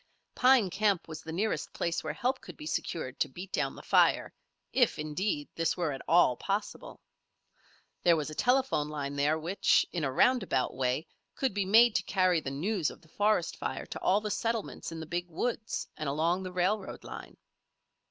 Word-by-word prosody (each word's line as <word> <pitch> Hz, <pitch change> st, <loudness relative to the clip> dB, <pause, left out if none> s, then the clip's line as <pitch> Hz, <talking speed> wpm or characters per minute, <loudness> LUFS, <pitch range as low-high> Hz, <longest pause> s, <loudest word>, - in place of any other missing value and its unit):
Pine 250 Hz, -7 st, +4 dB
Camp 200 Hz, -2 st, +1 dB
was 160 Hz, -1 st, -7 dB
the 160 Hz, -, -8 dB
nearest 205 Hz, +7 st, -2 dB
place 170 Hz, 0 st, -2 dB
where -, -, -4 dB
help 255 Hz, +2 st, -1 dB
could 180 Hz, -, -11 dB
be 150 Hz, -, -9 dB
secured 155 Hz, -4 st, -3 dB
to -, -, +1 dB
beat 180 Hz, +8 st, -9 dB
down 135 Hz, -2 st, 0 dB
the -, -, -11 dB
fire, -, -, +3 dB, 0.4 s
if, -, -, +3 dB
indeed, 155 Hz, 0 st, -2 dB
this 165 Hz, -1 st, 0 dB
were 170 Hz, -4 st, 0 dB
at 135 Hz, -, -6 dB
all 165 Hz, -7 st, +5 dB
possible. 205 Hz, -, -4 dB, 1.0 s
There 170 Hz, -1 st, +5 dB
was 155 Hz, -1 st, -3 dB
a -, -, -6 dB
telephone 250 Hz, -, +1 dB
line 145 Hz, -2 st, -4 dB
there 145 Hz, +2 st, +2 dB
which, 170 Hz, +5 st, +2 dB
in 170 Hz, -3 st, -2 dB
a 135 Hz, -, 0 dB
roundabout 195 Hz, -, +2 dB
way, 130 Hz, +4 st, 0 dB, 0.3 s
could 265 Hz, -5 st, 0 dB
be 200 Hz, -1 st, 0 dB
made 225 Hz, +4 st, +6 dB
to -, -, 0 dB
carry 185 Hz, -3 st, +2 dB
the 135 Hz, -, -4 dB
news 170 Hz, +5 st, -1 dB
of -, -, -13 dB
the 160 Hz, -, -21 dB
forest 205 Hz, -2 st, +1 dB
fire -, -, -4 dB
to -, -, -7 dB
all 200 Hz, +3 st, +3 dB
the 210 Hz, 0 st, -3 dB
settlements 225 Hz, -3 st, -2 dB
in 165 Hz, -, -6 dB
the 160 Hz, -, -6 dB
Big 175 Hz, +2 st, -3 dB
Woods 220 Hz, +6 st, -3 dB
and 155 Hz, -3 st, -3 dB
along 165 Hz, +6 st, +1 dB
the 185 Hz, -1 st, -5 dB
railroad 185 Hz, +3 st, -1 dB
line. -, -, -9 dB
175 Hz, 190 wpm, -30 LUFS, 155-205 Hz, 1.0 s, made